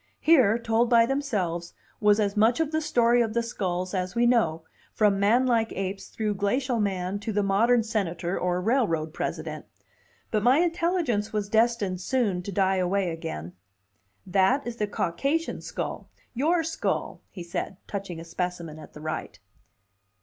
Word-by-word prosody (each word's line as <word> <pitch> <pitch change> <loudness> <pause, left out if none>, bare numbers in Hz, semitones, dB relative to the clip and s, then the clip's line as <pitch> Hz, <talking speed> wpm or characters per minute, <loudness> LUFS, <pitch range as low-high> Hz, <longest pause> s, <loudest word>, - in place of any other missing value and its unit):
Here, 255 -10 +5
told 230 0 +1
by 230 -2 +6
themselves, 200 -11 -2 0.3
was 210 0 +4
as 205 -1 0
much 220 +5 +3
of 320 -2 0
the 315 0 0
story 240 -5 +3
of 225 -1 -1
the 235 - +2
skulls 185 -5 -3
as 185 +2 -2
we 235 +1 +3
know, 190 -10 +2 0.3
from 205 -2 +3
manlike 230 +2 +3
apes 195 0 -4
through 215 -2 -2
glacial 240 +5 0
man 190 -1 -1
to 220 +2 -4
the 205 0 +1
modern 225 +5 +3
senator 180 -5 -2
or 180 0 0
railroad 180 - +1
president. - - -4 0.6
But 215 - +1
my 250 +5 +5
intelligence 335 - 0
was 210 -2 -2
destined 220 -5 +1
soon 205 -4 0
to 200 - -6
die 190 0 +2
away 185 0 0
again. 85 - -6 0.7
"That 190 +9 +2
is 240 -1 -5
the 210 - -1
Caucasian 275 - -1
skull: - - -5 0.2
your 325 +7 +2
skull," 325 0 -2
he 180 - -8
said, 170 +2 -4
touching 195 -4 -5
a 165 - -9
specimen 170 -2 -4
at - - -13
the 150 - -11
right. 155 0 -5
210 Hz, 160 wpm, -26 LUFS, 185-240 Hz, 0.7 s, by